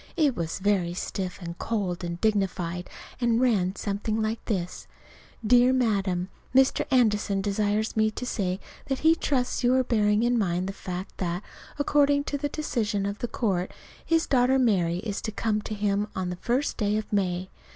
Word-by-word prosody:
It 295 -6 +3
was 165 -4 -3
very 190 -3 +1
stiff 185 0 -4
and 170 0 -5
cold 190 -6 -2
and 170 0 -4
dignified, 185 -4 -1 0.3
and 235 -2 +2
ran 200 -7 +2
something 210 +2 -2
like 220 +1 -2
this: 180 -5 -3 0.6
DEAR 245 +3 +6
MADAM: 195 -7 +1 0.3
Dr. 265 0 +4
Anderson 210 -6 +2
desires 205 +2 0
me 220 0 +3
to 235 +3 -6
say 190 -6 -1 0.3
that 270 -1 -2
he 320 - +8
trusts 260 -6 -1
you 245 +1 +4
are 260 - +3
bearing 210 -3 +2
in 240 0 +2
mind 180 -3 0
the 195 - -4
fact 185 0 -7
that, 175 +1 -2 0.3
according 285 -1 +3
to 285 - -2
the 290 +1 -1
decision 225 -10 -1
of 200 +1 -3
the 240 - -2
court, 190 -6 -1 0.3
his 330 0 +2
daughter 260 0 +3
Mary 185 -9 +2
is 205 -2 -3
to 220 - -3
come 215 0 -1
to 215 - -5
him 205 0 0
on 185 -1 -2
the - - -3
first 250 +9 -1
day 210 -1 +1
of 215 0 -5
May. 185 -2 0
210 Hz, 180 wpm, -27 LUFS, 185-245 Hz, 0.6 s, he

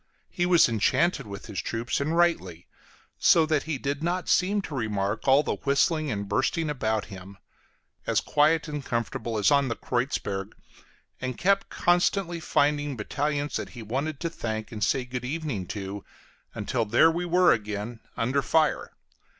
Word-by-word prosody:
He 175 0 0
was 175 -2 +6
enchanted 125 - +1
with 100 -1 -8
his 105 -5 -4
troops, 115 +4 -2
and 155 +4 0
rightly, 95 - +1 0.5
so 165 -2 +5
that 155 -2 +1
he 155 - 0
did 140 +2 -3
not 175 +2 -1
seem 200 +2 +2
to 155 - -7
remark 105 -3 -2
all 135 +2 +6
the - - -2
whistling 150 +2 +1
and 100 -4 -3
bursting 150 +9 0
about 110 -6 -1
him; 95 +1 -11 0.7
as - - +3
quiet 155 +2 +2
and 150 -2 -4
comfortable 115 -1 -3
as 105 - +3
on 140 -1 +4
the 115 - -2
Kreuzberg, 110 -5 -2 0.7
and 130 -2 -3
kept 195 +2 +2
constantly 175 0 +1
finding 145 -3 +1
battalions 145 +6 -2
that - - -5
he 115 - -6
wanted 135 +6 -3
to 170 - -1
thank 110 -6 -4
and 105 -2 -4
say 125 +5 +1
good 125 0 -5
evening 135 - -3
to, 100 0 -5 0.5
until 115 +3 -1
there 120 +10 +4
we 170 +2 -2
were 180 +1 +5
again 105 +2 -4 0.2
under 130 +5 +1
fire. 155 +1 +1
135 Hz, 165 wpm, -26 LUFS, 110-160 Hz, 0.7 s, was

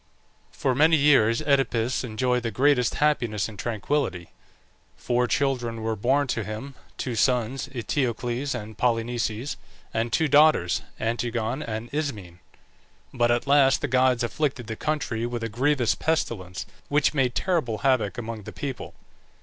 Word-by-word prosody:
For 130 - 0
many 155 +5 +5
years 135 -4 +4
Oedipus 135 -5 +1
enjoyed 125 +1 0
the 115 - -2
greatest 125 +1 +2
happiness 120 -9 +1
and 105 -3 -11
tranquillity. 115 - -2 0.7
Four 125 0 0
children 120 -5 -1
were 110 0 -1
born 135 +7 +2
to 115 - -1
him 110 +7 -6 0.2
two 125 - -3
sons, 125 +3 +1
Eteocles 125 0 -2
and 110 -2 -7
Polynices, 120 +1 -1 0.4
and 115 +1 -1
two 160 -1 +2
daughters, 145 - +4 0.2
Antigone 120 +3 -2
and 110 -1 -5
Ismene. 105 - -4 0.7
But 120 -1 +2
at 120 +2 +1
last 140 -1 +4
the 145 - -1
gods 130 -1 +3
afflicted 135 0 -2
the 110 - -5
country 125 -5 -2
with 120 -1 -4
a 115 - -2
grievous 125 +2 +1
pestilence, 105 - -2 0.2
which 145 -1 +2
made 130 -4 +1
terrible 160 - 0
havoc 115 -5 +1
among 115 -2 -5
the - - -7
people. 135 -4 -6
120 Hz, 140 wpm, -25 LUFS, 115-140 Hz, 0.7 s, many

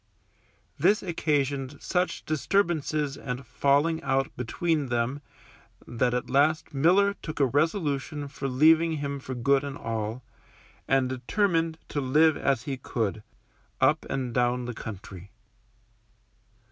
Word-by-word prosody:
This 210 - +3
occasioned 145 -5 -1
such 180 0 -1
disturbances 155 -3 0
and 125 +1 -5
falling 145 +7 +2
out 135 0 0
between 150 +4 -1
them 120 +3 -1 0.6
that 120 +1 0
at 125 - -2
last 155 +3 +2
Miller 185 +8 +4
took 155 - -6
a 140 - +5
resolution 145 - -1
for 140 0 -5
leaving 160 +5 +4
him 140 -2 -3
for 130 -1 -6
good 140 +3 +2
and 140 -1 -5
all, 115 +2 -4 0.6
and 135 -1 +3
determined 165 - 0
to 145 - -2
live 150 +4 +4
as 135 -4 0
he 140 -3 -4
could, 110 -4 -2 0.6
up - - +2
and 130 -3 -2
down 125 0 +1
the 125 - -4
country. 100 -3 -9
140 Hz, 125 wpm, -27 LUFS, 125-155 Hz, 0.6 s, a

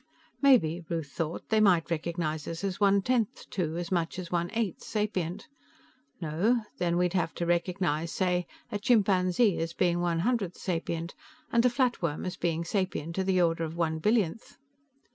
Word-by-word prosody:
Maybe, 180 - +4
Ruth 160 -4 -3
thought, 165 -1 -4
they 220 - +3
might 180 -6 +4
recognize 160 -2 -2
us 165 +3 -5
as 195 -2 -2
one 200 -1 +4
tenth 245 -3 0
to 165 -3 -2
as 175 0 -4
much 170 -1 0
as 180 -2 -6
one 175 0 0
eighth 220 -7 -1
sapient. 205 - -2 0.7
No, 185 +9 +1 0.2
then 175 -1 +1
we'd 180 -1 +1
have 170 -3 0
to 170 - -2
recognize, 175 -2 0
say, 180 +1 0 0.2
a 205 - -2
chimpanzee 195 -2 +3
as 165 0 -2
being 175 -1 +2
one 175 -1 0
one - - 0
hundredth 210 -5 0
sapient, 170 -1 -3 0.4
and 235 0 +4
a - - +4
flatworm 240 - 0
as 185 - -3
being 170 -1 -1
sapient 175 -3 -2
to 190 - 0
the 185 -1 +3
order 165 -1 +1
of 160 +1 -5
one 160 -2 0
billionth. 210 +1 0
175 Hz, 175 wpm, -29 LUFS, 165-200 Hz, 0.7 s, Maybe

